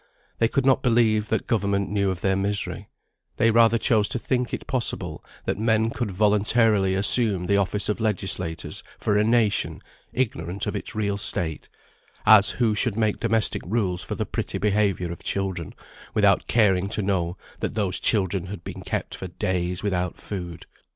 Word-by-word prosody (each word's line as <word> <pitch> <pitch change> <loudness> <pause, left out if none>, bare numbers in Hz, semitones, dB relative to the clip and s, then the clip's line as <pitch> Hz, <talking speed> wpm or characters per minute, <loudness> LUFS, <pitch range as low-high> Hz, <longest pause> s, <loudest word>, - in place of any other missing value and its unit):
They 115 - +4
could 135 +3 -1
not 135 -1 +4
believe 115 -3 +2
that 110 - -1
government 100 -3 0
knew 100 -1 +1
of 90 -2 -4
their 95 0 +1
misery; 100 +1 -3 0.5
they 115 - +3
rather 115 0 +5
chose 110 -3 +2
to - - -2
think 125 0 -1
it - - -5
possible 95 - -2 0.2
that - - -2
men 110 0 +2
could 120 -3 -3
voluntarily 105 0 +2
assume 100 -2 +4
the 100 +2 +2
office 100 +1 0
of 105 - -1
legislators 95 -6 -2 0.2
for 105 - 0
a 105 - +3
nation, 115 -2 +1 0.3
ignorant 100 -7 -2
of - - -3
its - - -5
real 100 -2 -1
state; 85 -6 -1 0.6
as 105 -2 +7
who 115 -3 +1
should 105 0 +1
make 110 -2 0
domestic 115 -1 +1
rules 95 -3 -1
for - - -5
the - - -2
pretty - - -3
behaviour 100 -4 0
of 85 - -8
children, 95 -5 -3 0.4
without - - +3
caring 100 -4 +2
to 105 -1 -1
know 90 -2 -1 0.2
that - - -3
those 95 -4 0
children 95 -4 +2
had 90 -2 -8
been - - -8
kept - - -4
for 95 - -6
days 90 0 -2
without 90 -3 -2
food. 90 -4 -7
100 Hz, 170 wpm, -24 LUFS, 95-110 Hz, 0.6 s, as